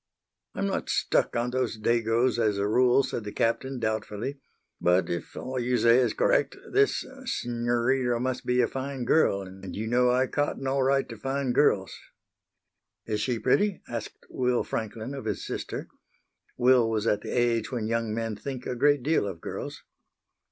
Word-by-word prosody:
"I'm -, -, -1 dB
not -, -, -2 dB
stuck -, -, +1 dB
on 120 Hz, +1 st, 0 dB
those 125 Hz, -3 st, -1 dB
Dagos 115 Hz, +2 st, +2 dB
as 105 Hz, -3 st, +2 dB
a 100 Hz, 0 st, 0 dB
rule," 125 Hz, +4 st, +4 dB
said 115 Hz, -, -4 dB
the 105 Hz, -, -6 dB
Captain, 130 Hz, +5 st, 0 dB
doubtfully, 110 Hz, +3 st, -3 dB, 0.4 s
"but 90 Hz, +1 st, +2 dB
if 85 Hz, -, -5 dB
all 130 Hz, 0 st, -3 dB
you 125 Hz, +1 st, +1 dB
say 115 Hz, +1 st, +5 dB
is 130 Hz, -, +1 dB
correct -, -, +2 dB
this 415 Hz, 0 st, +2 dB, 0.2 s
s'norita 120 Hz, -, 0 dB
must 130 Hz, +1 st, -2 dB
be 125 Hz, 0 st, +2 dB
a 120 Hz, -, +2 dB
fine 135 Hz, -1 st, -4 dB
girl, 100 Hz, -9 st, +3 dB
and 95 Hz, 0 st, -9 dB
you 110 Hz, -, -3 dB
know 125 Hz, +2 st, +3 dB
I 125 Hz, +1 st, +3 dB
cotton 145 Hz, 0 st, -2 dB
all 135 Hz, +1 st, +1 dB
right 135 Hz, +1 st, +2 dB
to 115 Hz, -, -8 dB
fine 135 Hz, +2 st, -1 dB
girls." 105 Hz, -7 st, +2 dB, 1.1 s
"Is 105 Hz, -2 st, -2 dB
she 120 Hz, +2 st, 0 dB
pretty?" 195 Hz, -, +1 dB
asked 115 Hz, -2 st, -6 dB
Will 125 Hz, -1 st, 0 dB
Franklin 110 Hz, +3 st, -4 dB
of 135 Hz, -, -6 dB
his -, -, -3 dB
sister. -, -, -5 dB, 0.7 s
Will 125 Hz, -2 st, +4 dB
was 110 Hz, -1 st, -1 dB
at 105 Hz, -2 st, +1 dB
the -, -, -7 dB
age 120 Hz, -1 st, +1 dB
when 120 Hz, -4 st, -2 dB
young 115 Hz, 0 st, -1 dB
men 115 Hz, 0 st, -2 dB
think 130 Hz, +4 st, -6 dB
a 125 Hz, -, -3 dB
great 145 Hz, +1 st, +3 dB
deal 155 Hz, -7 st, +2 dB
of 95 Hz, -4 st, -6 dB
girls. -, -, -6 dB
120 Hz, 175 wpm, -27 LUFS, 110-130 Hz, 1.1 s, say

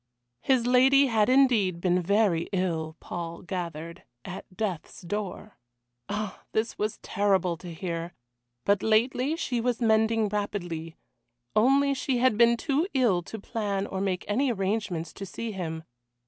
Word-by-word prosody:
His 255 Hz, -3 st, +2 dB
lady 265 Hz, +3 st, +5 dB
had 220 Hz, -4 st, +2 dB
indeed 240 Hz, -10 st, +4 dB
been 180 Hz, 0 st, +2 dB
very 195 Hz, -2 st, +2 dB
ill, 165 Hz, -4 st, -1 dB
Paul 170 Hz, -1 st, -6 dB
gathered 170 Hz, -3 st, -5 dB, 0.2 s
at 185 Hz, 0 st, -9 dB
death's 195 Hz, -7 st, -4 dB
door. 205 Hz, -, -5 dB, 0.5 s
Ah! 210 Hz, -2 st, -4 dB
this 220 Hz, +1 st, 0 dB
was 210 Hz, 0 st, -2 dB
terrible 190 Hz, -3 st, +1 dB
to 175 Hz, +1 st, -9 dB
hear 170 Hz, 0 st, -5 dB, 0.5 s
but 200 Hz, -1 st, +3 dB
lately 250 Hz, +6 st, +2 dB
she 250 Hz, -8 st, -1 dB
was 245 Hz, -1 st, 0 dB
mending 220 Hz, -1 st, +3 dB
rapidly, 175 Hz, -6 st, -3 dB, 0.6 s
only 275 Hz, +5 st, +4 dB
she 265 Hz, -1 st, -1 dB
had 245 Hz, -2 st, +3 dB
been 235 Hz, +1 st, +5 dB
too 295 Hz, +7 st, 0 dB
ill 230 Hz, -9 st, +3 dB
to 220 Hz, -, -8 dB
plan 200 Hz, -2 st, -2 dB
or 190 Hz, -1 st, -4 dB
make 190 Hz, -2 st, -1 dB
any 255 Hz, +5 st, +1 dB
arrangements 195 Hz, -5 st, -2 dB
to 200 Hz, -, -8 dB
see 220 Hz, +4 st, -5 dB
him. 160 Hz, -5 st, -4 dB
205 Hz, 145 wpm, -27 LUFS, 180-230 Hz, 0.6 s, lady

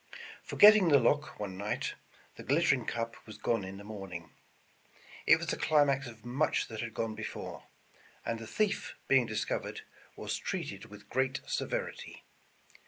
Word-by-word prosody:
Forgetting 210 Hz, -3 st, +7 dB
the 145 Hz, -3 st, +7 dB
lock 145 Hz, +4 st, +1 dB
one 95 Hz, -3 st, -5 dB
night, 105 Hz, +1 st, -2 dB, 0.4 s
the -, -, -9 dB
glittering 135 Hz, -4 st, +2 dB
cup 115 Hz, -1 st, -2 dB
was 110 Hz, -, -9 dB
gone 115 Hz, -4 st, 0 dB
in 95 Hz, +1 st, -7 dB
the 100 Hz, -, -10 dB
morning. 95 Hz, -6 st, -7 dB, 1.0 s
It -, -, +8 dB
was -, -, -4 dB
the -, -, -1 dB
climax 140 Hz, -3 st, +3 dB
of 115 Hz, -1 st, -12 dB
much 135 Hz, +6 st, 0 dB
that 110 Hz, -2 st, -5 dB
had 120 Hz, -2 st, -5 dB
gone 115 Hz, -1 st, -1 dB
before, -, -, -6 dB, 0.6 s
and 115 Hz, -1 st, -2 dB
the 115 Hz, -, -8 dB
thief 210 Hz, -, -1 dB
being 130 Hz, -3 st, +4 dB
discovered, 110 Hz, -, -2 dB, 0.3 s
was -, -, -3 dB
treated -, -, -4 dB
w^ith 105 Hz, 0 st, -13 dB
great 130 Hz, +3 st, 0 dB
severity. -, -, -3 dB
115 Hz, 155 wpm, -32 LUFS, 105-140 Hz, 1.0 s, It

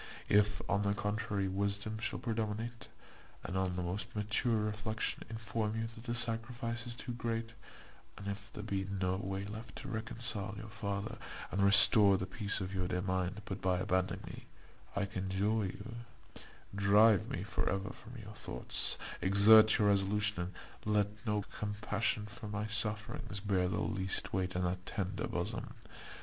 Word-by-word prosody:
If, 105 Hz, 0 st, +3 dB
on 100 Hz, -, +2 dB
the 100 Hz, 0 st, +1 dB
contrary, 105 Hz, -1 st, -1 dB
wisdom 100 Hz, +3 st, -1 dB
shall 110 Hz, -, -2 dB
predominate, 115 Hz, 0 st, -3 dB, 0.6 s
and, 90 Hz, -, -4 dB
on 95 Hz, -1 st, 0 dB
the 90 Hz, -, -2 dB
most 100 Hz, +6 st, -4 dB
mature 105 Hz, +3 st, +1 dB
reflection, 105 Hz, +1 st, -2 dB
inform 110 Hz, -1 st, -2 dB
you, 115 Hz, -, -1 dB
that 115 Hz, 0 st, -9 dB
the 120 Hz, -1 st, -2 dB
sacrifice 115 Hz, 0 st, -2 dB
is 120 Hz, -, -4 dB
too 120 Hz, -, -6 dB
great; 115 Hz, -1 st, -3 dB, 0.6 s
and 100 Hz, -, -7 dB
if 100 Hz, 0 st, -5 dB
there 105 Hz, -, -7 dB
be 100 Hz, -2 st, -1 dB
no 95 Hz, -1 st, 0 dB
way 95 Hz, 0 st, -3 dB
left 110 Hz, +2 st, -8 dB
to -, -, -7 dB
reconcile 110 Hz, -3 st, -3 dB
your 110 Hz, 0 st, -8 dB
father, 100 Hz, -2 st, -3 dB, 0.3 s
and 100 Hz, -, 0 dB
restore 100 Hz, 0 st, +9 dB
the 95 Hz, -, -2 dB
peace 100 Hz, +2 st, -2 dB
of 95 Hz, +1 st, -4 dB
your 90 Hz, -2 st, -1 dB
dear 90 Hz, 0 st, -1 dB
mind, 95 Hz, +2 st, -1 dB
but 95 Hz, 0 st, -5 dB
by 90 Hz, -1 st, +2 dB
abandoning 95 Hz, 0 st, 0 dB
me, -, -, -9 dB, 0.5 s
I 100 Hz, -, +1 dB
conjure 100 Hz, +2 st, 0 dB
you 115 Hz, +5 st, -7 dB, 0.8 s
drive 100 Hz, +1 st, +5 dB
me -, -, -3 dB
for -, -, -1 dB
ever 95 Hz, +2 st, -2 dB
from 120 Hz, +1 st, -12 dB
your 105 Hz, -2 st, -9 dB
thoughts, 60 Hz, -11 st, 0 dB, 0.2 s
exert 105 Hz, +4 st, +7 dB
your 105 Hz, -3 st, +4 dB
resolution, 100 Hz, +1 st, +2 dB, 0.4 s
and 105 Hz, -, 0 dB
let 105 Hz, +1 st, 0 dB
no 105 Hz, -1 st, +1 dB, 0.2 s
compassion 105 Hz, +1 st, -1 dB
for 105 Hz, +1 st, -8 dB
my 105 Hz, +1 st, -2 dB
sufferings 105 Hz, -2 st, -3 dB
bear 95 Hz, -2 st, +1 dB
the -, -, -1 dB
least 95 Hz, -2 st, -2 dB
weight 90 Hz, -1 st, -1 dB
in 90 Hz, -, 0 dB
that 90 Hz, +1 st, -1 dB
tender 100 Hz, -3 st, -2 dB
bosom. -, -, -3 dB
105 Hz, 165 wpm, -34 LUFS, 95-110 Hz, 0.8 s, restore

